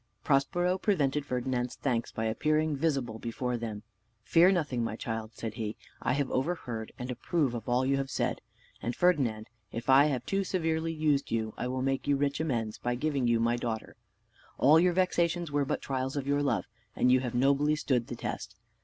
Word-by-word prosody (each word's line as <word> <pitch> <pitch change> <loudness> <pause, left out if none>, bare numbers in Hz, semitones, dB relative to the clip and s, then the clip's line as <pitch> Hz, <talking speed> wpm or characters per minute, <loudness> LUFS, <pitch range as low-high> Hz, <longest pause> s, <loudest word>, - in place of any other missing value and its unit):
Prospero 175 +6 +2
prevented 150 -8 +1
Ferdinand's 125 0 -1
thanks 120 -4 -1
by 110 - -3
appearing 155 +7 +1
visible 135 -7 -1
before 125 +2 -2
them. 110 -3 -5 0.4
"Fear 170 +9 +5
nothing, 145 -9 0
my 110 -1 -2
child," 110 -2 -5
said 110 -1 -5
he; 110 -1 -4 0.2
"I - - +1
have 140 -1 -1
overheard, 130 -7 -2
and 125 +1 -5
approve 140 +1 0
of 120 0 -5
all 125 +2 +2
you 135 +1 +2
have 135 -1 -2
said. - - -1 0.4
And, 120 0 -2
Ferdinand, 130 -12 +2 0.2
if 115 +3 -1
I 135 +2 +7
have 130 -5 -1
too 195 0 0
severely 165 -3 -1
used 155 -3 +1
you, 110 -1 -1
I 125 - -3
will 130 +1 -2
make 135 0 -1
you 145 - +4
rich 140 +1 0
amends, 120 -9 -2
by 120 0 -1
giving 140 -1 0
you 120 -1 +3
my 120 +1 +2
daughter. 115 -2 -4 0.6
All 150 +5 +6
your 180 +1 +3
vexations 175 -2 +1
were 145 -1 +1
but - - -2
trials 130 0 -2
of 140 - -2
your 145 +1 +1
love, 115 -10 0 0.3
and 125 - +3
you 130 - +6
have 125 -2 -4
nobly 140 +4 +3
stood 125 -6 0
the 120 - -5
test. 110 -3 -5
130 Hz, 195 wpm, -30 LUFS, 120-150 Hz, 0.6 s, I